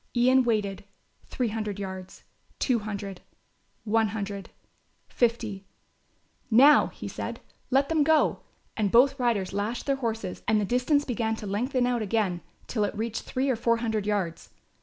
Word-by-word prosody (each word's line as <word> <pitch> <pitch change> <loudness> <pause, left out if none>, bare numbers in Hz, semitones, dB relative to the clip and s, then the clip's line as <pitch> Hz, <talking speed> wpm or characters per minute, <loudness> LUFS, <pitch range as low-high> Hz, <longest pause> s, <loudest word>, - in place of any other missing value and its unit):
Ian 255 +2 +5
waited, 205 -5 -1 0.4
three 245 -3 -1
hundred 210 -2 -3
yards, 190 -2 -7 0.3
two 250 -4 +1
hundred, 200 -3 -6 0.6
one 225 0 +2
hundred, 200 -2 -5 0.6
fifty. 225 -5 -1 0.8
"Now," 270 +6 +7
he - - -8
said, - - -5 0.3
"let 275 +2 +3
them 315 -1 +2
go," 315 +1 +3 0.4
and 205 -3 0
both 270 +3 +5
riders 225 -7 0
lashed 210 +4 -2
their 275 -1 +1
horses 225 -7 -3
and 220 -2 +3
the 205 - 0
distance 255 +6 +2
began 225 -3 -1
to 220 - -8
lengthen 245 +6 0
out 245 -2 0
again 200 -4 0 0.2
till 215 -3 -1
it 205 - -2
reached 225 +1 -2
three 260 +2 -1
or 260 - +2
four 230 0 +2
hundred 220 -3 -2
yards. 190 -6 -2
225 Hz, 155 wpm, -27 LUFS, 205-250 Hz, 0.8 s, Now